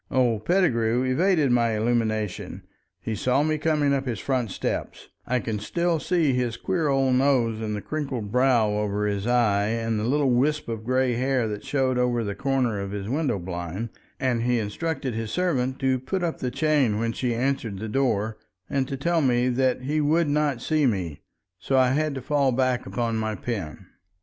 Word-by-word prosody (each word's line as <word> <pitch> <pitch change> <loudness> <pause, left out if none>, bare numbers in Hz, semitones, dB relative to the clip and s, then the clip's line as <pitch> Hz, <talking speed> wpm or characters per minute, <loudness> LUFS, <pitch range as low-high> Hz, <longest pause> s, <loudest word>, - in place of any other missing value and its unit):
Old 120 -5 +1
Pettigrew 125 -10 +2
evaded 150 +2 +2
my 115 -2 +2
illumination; 110 -3 -1 0.4
he 110 - -4
saw 125 +6 +1
me 155 0 0
coming 150 -3 +2
up 135 -1 -1
his 120 -3 -2
front 125 -2 -1
steps—I 125 +5 -4
can 110 -3 -3
still 170 +9 0
see 165 -5 +1
his 125 -2 -1
queer 175 -5 -1
old 135 -2 +2
nose 125 -4 +2
and 105 -1 -2
the 105 - -5
crinkled 135 -9 -4
brow 125 -3 +3
over 105 0 -1
his 100 +1 -1
eye 110 -5 +2
and 115 0 -1
the - - -2
little 135 +3 +2
wisp 145 +5 +1
of 110 -1 -4
gray 130 0 +2
hair 130 -1 +1
that 105 -1 -5
showed 130 -3 0
over 120 -1 +1
the 100 -1 -3
corner 125 -5 0
of 100 - -4
his 100 0 -5
window 140 -2 0
blind—and 95 - -4
he 120 +1 +1
instructed 130 +5 -3
his 115 0 -3
servant 130 -6 0
to 130 -1 +1
put 175 +9 -3
up 170 -2 -2
the 125 - -1
chain 145 -7 +2
when 115 +1 0
she 120 0 -1
answered 125 -4 -1
the 110 +3 -5
door, 110 -3 0 0.3
and 135 -2 -1
to 135 - -4
tell 170 +4 +1
me 125 -2 +2
that 130 0 +1
he 150 +3 0
would 155 +3 +2
not 145 -4 0
see 155 -3 +2
me. 90 - -2 0.4
So 135 - 0
I 130 -1 +5
had 150 +1 0
to 135 - -5
fall 140 -1 +2
back 130 0 0
upon 115 -2 -1
my 110 -1 -2
pen. 95 -7 -5
125 Hz, 190 wpm, -25 LUFS, 110-140 Hz, 0.4 s, I